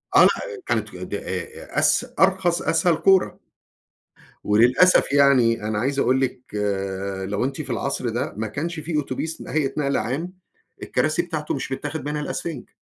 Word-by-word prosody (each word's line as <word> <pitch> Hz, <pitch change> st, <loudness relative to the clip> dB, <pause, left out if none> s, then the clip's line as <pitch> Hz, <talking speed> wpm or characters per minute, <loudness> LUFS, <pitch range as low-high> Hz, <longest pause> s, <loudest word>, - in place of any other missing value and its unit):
آه -, -, +9 dB
لأ، 450 Hz, -5 st, +1 dB
كانت -, -, -2 dB
د -, -, -7 dB
أ 465 Hz, +2 st, -4 dB
أس -, -, +3 dB
أرخص، 190 Hz, -2 st, +3 dB
أسهل 175 Hz, -3 st, +2 dB
كورة. 190 Hz, +3 st, +3 dB, 1.1 s
وللأسف 125 Hz, -, +4 dB
يعني 130 Hz, -6 st, +4 dB
أنا 105 Hz, 0 st, -2 dB
عايز 135 Hz, +5 st, -1 dB
أقول 130 Hz, -1 st, +3 dB
لِك 130 Hz, -2 st, -1 dB, 0.9 s
لو 105 Hz, +3 st, -1 dB
أنتِ 135 Hz, +3 st, -3 dB
في 135 Hz, -, -10 dB
العصر 125 Hz, +1 st, -2 dB
ده 120 Hz, +2 st, -3 dB
ما 110 Hz, +1 st, -2 dB
كانش 155 Hz, +9 st, -4 dB
في 155 Hz, +1 st, -3 dB
أوتوبيس 150 Hz, +3 st, -3 dB
ن -, -, -9 dB
هيئة 145 Hz, -3 st, 0 dB
نقل 140 Hz, -1 st, 0 dB
عام، 155 Hz, +10 st, -2 dB, 0.5 s
الكراسي 155 Hz, +3 st, 0 dB
بتاعته 160 Hz, -3 st, -3 dB
مش 135 Hz, 0 st, -4 dB
متاخد 150 Hz, +1 st, -4 dB
منها 150 Hz, 0 st, -2 dB
الإسفنج. 150 Hz, -1 st, -5 dB
140 Hz, 160 wpm, -23 LUFS, 125-170 Hz, 1.1 s, آه